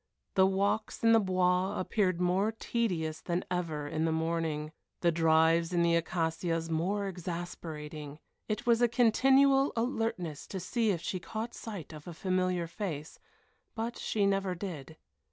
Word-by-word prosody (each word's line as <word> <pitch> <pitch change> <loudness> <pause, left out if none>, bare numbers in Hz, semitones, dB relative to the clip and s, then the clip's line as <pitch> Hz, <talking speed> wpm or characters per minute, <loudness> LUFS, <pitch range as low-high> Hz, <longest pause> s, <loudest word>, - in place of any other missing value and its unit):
The 190 0 +5
walks 200 +4 0
in 230 - +6
the 225 - +7
Bois 185 0 +1
appeared 185 -2 +1
more 185 +4 +2
tedious 185 -9 -2
than 175 +1 -2
ever 160 -5 -2
in 155 +2 -1
the 165 - +1
morning, 160 -2 -1 0.3
the 170 - +4
drives 165 +1 +3
in 170 -1 +3
the 170 0 +3
Acacias 165 0 -1
more 195 +5 0
exasperating. 160 -4 -6 0.3
It 215 +1 -2
was 235 -1 +4
a 240 - +6
continual 270 +4 +4
alertness 225 - -2
to 190 - -5
see 225 +5 0
if 175 -5 0
she 185 +2 -3
caught 220 +6 -5
sight 200 -8 -7
of 150 +1 -11
a 170 - -7
familiar 185 -1 0
face, 165 -4 -5 0.6
but 230 +1 -3
she 205 -2 0
never 195 -2 +1
did. 160 -5 -7
180 Hz, 155 wpm, -31 LUFS, 165-210 Hz, 0.6 s, the